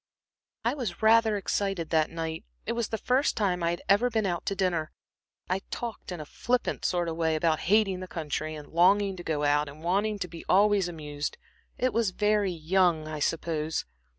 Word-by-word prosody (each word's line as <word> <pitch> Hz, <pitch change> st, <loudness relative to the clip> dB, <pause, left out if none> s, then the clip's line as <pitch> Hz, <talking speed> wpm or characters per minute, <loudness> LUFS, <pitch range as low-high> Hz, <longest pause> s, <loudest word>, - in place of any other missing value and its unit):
"I -, -, +2 dB
was 230 Hz, -9 st, -4 dB
rather 220 Hz, -1 st, +5 dB
excited 195 Hz, -3 st, -2 dB
that 160 Hz, -1 st, +3 dB
night 165 Hz, -1 st, -4 dB, 0.2 s
it -, -, -1 dB
was 235 Hz, -2 st, -1 dB
the 220 Hz, -, -2 dB
first 255 Hz, +6 st, +1 dB
time 185 Hz, -5 st, +1 dB
I 170 Hz, -, +2 dB
had 170 Hz, +1 st, -3 dB
ever 210 Hz, +5 st, +4 dB
been 220 Hz, -3 st, 0 dB
out 175 Hz, -3 st, -2 dB
to 195 Hz, -, 0 dB
dinner. 175 Hz, -5 st, 0 dB, 0.6 s
I 185 Hz, +1 st, 0 dB
talked 235 Hz, -5 st, -5 dB
in 175 Hz, -, -5 dB
a 155 Hz, -, -6 dB
flippant 245 Hz, +10 st, -1 dB
sort 175 Hz, -1 st, +1 dB
of 165 Hz, -, -2 dB
way 160 Hz, -1 st, +1 dB
about 155 Hz, 0 st, +1 dB
hating 200 Hz, -3 st, +3 dB
the 185 Hz, -, -6 dB
country, 155 Hz, -2 st, -3 dB
and 150 Hz, -1 st, -9 dB
longing 195 Hz, +3 st, +3 dB
to 175 Hz, -, -7 dB
go 150 Hz, -3 st, -1 dB
out, 145 Hz, 0 st, +2 dB
and 150 Hz, +3 st, -12 dB
wanting 205 Hz, +5 st, +1 dB
to 190 Hz, -2 st, -3 dB
be 170 Hz, -1 st, -10 dB
always 200 Hz, -1 st, +4 dB
amused. 150 Hz, -3 st, -5 dB, 0.4 s
It 255 Hz, 0 st, +1 dB
was 230 Hz, -3 st, +2 dB
very 210 Hz, +1 st, +1 dB
young, 170 Hz, -1 st, +2 dB
I 155 Hz, -1 st, -5 dB
suppose." 160 Hz, 0 st, -1 dB
180 Hz, 200 wpm, -28 LUFS, 160-205 Hz, 0.6 s, rather